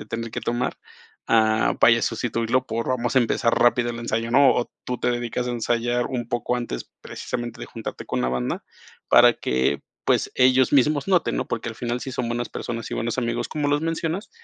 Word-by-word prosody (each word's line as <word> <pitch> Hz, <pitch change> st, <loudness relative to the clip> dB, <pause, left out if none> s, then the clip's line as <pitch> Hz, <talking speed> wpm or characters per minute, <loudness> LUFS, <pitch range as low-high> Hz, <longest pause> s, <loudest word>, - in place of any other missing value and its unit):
de 105 Hz, -, -9 dB
tener 115 Hz, +1 st, -4 dB
que -, -, -3 dB
tomar, 120 Hz, +1 st, -1 dB, 0.5 s
ah, 110 Hz, -1 st, +3 dB
vaya, 115 Hz, -1 st, +6 dB
sustituirlo 115 Hz, +2 st, 0 dB
por 115 Hz, +1 st, -3 dB
vamos 120 Hz, -2 st, -1 dB
a -, -, +7 dB
empezar 115 Hz, 0 st, +1 dB
rápido 120 Hz, 0 st, +3 dB
el 115 Hz, 0 st, -6 dB
ensayo, 115 Hz, 0 st, -2 dB
¿no? 140 Hz, +1 st, +6 dB
O 120 Hz, -, -1 dB
tú 125 Hz, -1 st, -3 dB
te -, -, +1 dB
dedicas 120 Hz, 0 st, -2 dB
a -, -, -1 dB
ensayar 120 Hz, +1 st, 0 dB
un 120 Hz, -3 st, -4 dB
poco 120 Hz, +1 st, -1 dB
antes 120 Hz, -, -5 dB
precisamente 120 Hz, -1 st, -5 dB
de -, -, -6 dB
juntarte -, -, -7 dB
con -, -, -2 dB
la 60 Hz, -, +1 dB
banda, 65 Hz, 0 st, -2 dB, 0.4 s
para -, -, +7 dB
que, 65 Hz, +1 st, 0 dB, 0.2 s
pues, -, -, +2 dB
ellos 130 Hz, 0 st, +4 dB
mismos 145 Hz, +3 st, +3 dB
noten, 180 Hz, -3 st, +2 dB
¿no? -, -, -2 dB
Porque, 115 Hz, +1 st, -3 dB
al 115 Hz, -, -6 dB
final 120 Hz, +1 st, -3 dB
si 130 Hz, -, -6 dB
son 120 Hz, -1 st, -2 dB
buenas 120 Hz, 0 st, -2 dB
personas 115 Hz, -1 st, -5 dB
y -, -, -2 dB
buenos 115 Hz, +1 st, -2 dB
amigos, 120 Hz, -2 st, -1 dB
como 150 Hz, -2 st, -1 dB
los 145 Hz, 0 st, +2 dB
mencionas, 165 Hz, +4 st, -2 dB
120 Hz, 210 wpm, -23 LUFS, 115-125 Hz, 0.5 s, a